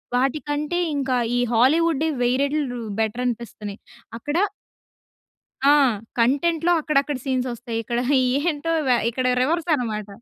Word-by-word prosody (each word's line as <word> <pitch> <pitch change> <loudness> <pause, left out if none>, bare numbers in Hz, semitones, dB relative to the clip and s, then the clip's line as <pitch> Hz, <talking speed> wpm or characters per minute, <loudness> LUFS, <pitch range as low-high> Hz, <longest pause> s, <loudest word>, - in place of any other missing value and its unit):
వాటికంటే 290 +5 -1 0.2
ఇంకా 265 -2 0 0.2
ఈ - - +2
హాలీవుడ్ 310 +6 +3 0.2
వెయ్యి 245 +1 +2
రెట్లు 280 -3 -1 0.2
బెటర్ 225 +3 -1
అనిపిస్తున్నాయి 215 -4 -4 0.4
అక్కడ 290 +7 -3 1.3
ఆ! 285 - +7 0.5
కంటెంట్‌లో 315 +8 +2
అక్కడక్కడ 290 -2 0
సీన్స్ 255 -2 -1
ఒస్తాయి. 230 -1 -5
ఇక్కడ 235 +2 -2 0.5
ఏంటో 310 +2 -3 0.2
వె 250 - +5
ఇక్కడ 255 +2 -2 0.2
రివర్స్ 335 +5 0
అన్నమాట. 215 -6 -3
265 Hz, 115 wpm, -23 LUFS, 240-300 Hz, 1.3 s, ఆ